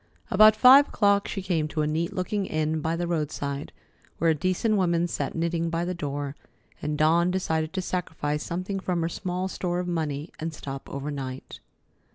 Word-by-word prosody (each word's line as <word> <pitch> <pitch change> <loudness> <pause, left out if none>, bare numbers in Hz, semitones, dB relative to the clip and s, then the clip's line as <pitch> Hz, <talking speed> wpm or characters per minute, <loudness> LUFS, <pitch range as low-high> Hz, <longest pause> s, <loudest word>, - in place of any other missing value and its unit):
About 215 0 +7
five 260 +6 +8
o'clock 200 -1 +2
she 195 - -4
came 165 -5 0
to 155 0 -1
a - - +1
neat 160 +3 -1
looking 190 +2 -2
inn 155 0 0
by 160 +2 0
the 175 +1 -2
roadside, 150 -4 -3 0.5
where 165 0 +3
a - - +4
decent 185 +8 0
woman 175 -3 +2
sat - - -3
knitting 165 0 0
by 165 +1 -1
the 180 - -2
door, 145 -3 -4 0.5
and 150 0 -2
Dawn 165 +3 +4
decided 160 -4 -1
to 190 -1 -2
sacrifice 155 -5 -2
something 185 +3 -3
from 180 -2 -1
her 165 - 0
small 180 +1 -3
store 180 -2 -2
of 180 - -3
money 155 -3 -2
and 160 0 -4
stop 135 -1 -7
overnight. 140 -2 -6
170 Hz, 185 wpm, -26 LUFS, 150-185 Hz, 0.5 s, five